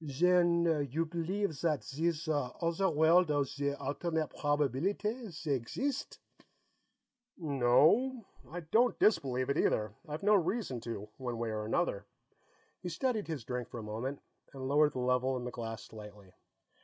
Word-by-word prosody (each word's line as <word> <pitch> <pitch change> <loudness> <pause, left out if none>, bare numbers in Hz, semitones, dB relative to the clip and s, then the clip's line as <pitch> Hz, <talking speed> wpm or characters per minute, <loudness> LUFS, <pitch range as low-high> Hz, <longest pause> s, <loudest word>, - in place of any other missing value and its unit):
"Zen 170 0 +3
you 165 +4 0
believe 170 +3 -2
zat 155 -1 0
zeese 165 +3 -2 0.3
ozzer 170 +3 +1
world 160 +3 +5
of 145 -2 +1
zee 140 +1 -2
alternate 155 +3 -2
probabeelitay, 175 - -1
zey 155 -3 -3
exist?" 260 - -3 1.2
"No. 160 - +3 0.2
I 175 +2 -5
don't 225 +10 +2
disbelieve 130 - +2
it, 140 - 0
either. 105 -1 +1 0.2
I've 150 +5 -5
no 210 +1 +5
reason 185 - 0
to, 110 -3 -6
one 125 -3 -4
way 115 -1 -2
or 105 0 -3
another." 105 - -1 0.7
He 180 - -5
studied 215 +5 -1
his 155 -7 -4
drink 125 0 -4
for - - -7
a 115 - -6
moment, 115 +6 -4 0.3
and 130 -1 -5
lowered 150 +1 +4
the - - -4
level 125 +1 +1
in 125 - -5
the 125 - -4
glass 115 -2 -6
slightly. 105 -3 -12
150 Hz, 150 wpm, -32 LUFS, 125-175 Hz, 1.2 s, world